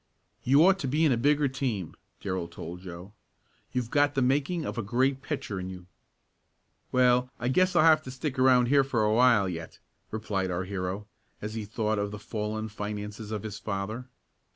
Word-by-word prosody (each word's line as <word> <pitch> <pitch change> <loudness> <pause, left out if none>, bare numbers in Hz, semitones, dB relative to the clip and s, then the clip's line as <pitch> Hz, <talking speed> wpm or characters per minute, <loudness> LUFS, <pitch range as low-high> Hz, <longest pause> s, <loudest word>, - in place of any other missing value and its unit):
"You 140 +6 +6
ought 195 0 +5
to 135 - -2
be 150 +5 +2
in 150 - +4
a - - +4
bigger 145 +4 +3
team," 125 - -3 0.3
Darrell 95 -3 -2
told 85 +1 -8
Joe. 90 +2 -9 0.6
"You've 125 -2 -2
got 145 0 +3
the 135 - +2
making 145 +6 +1
of - - -3
a - - +1
great 130 +5 +1
pitcher 135 -10 -4
in 95 0 -5
you." 90 -1 -9 1.1
"Well, 125 0 +4
I 120 +1 -1
guess 185 +6 +3
I'll 170 - +6
have 160 -1 +6
to - - -6
stick 130 +1 -4
around 130 -1 +5
here 140 0 +5
for 125 -5 0
a 105 0 +3
while 120 -4 +5
yet," 85 -2 -6 0.3
replied 105 -3 -2
our 90 +1 -1
hero, 95 +1 -4 0.3
as 105 +1 -5
he 110 -2 -4
thought 110 0 -1
of 100 0 -1
the 105 - -7
fallen 110 +1 -4
finances 105 0 -6
of 110 -2 -4
his 105 -1 -6
father. 110 +4 -4
110 Hz, 195 wpm, -28 LUFS, 100-135 Hz, 1.1 s, You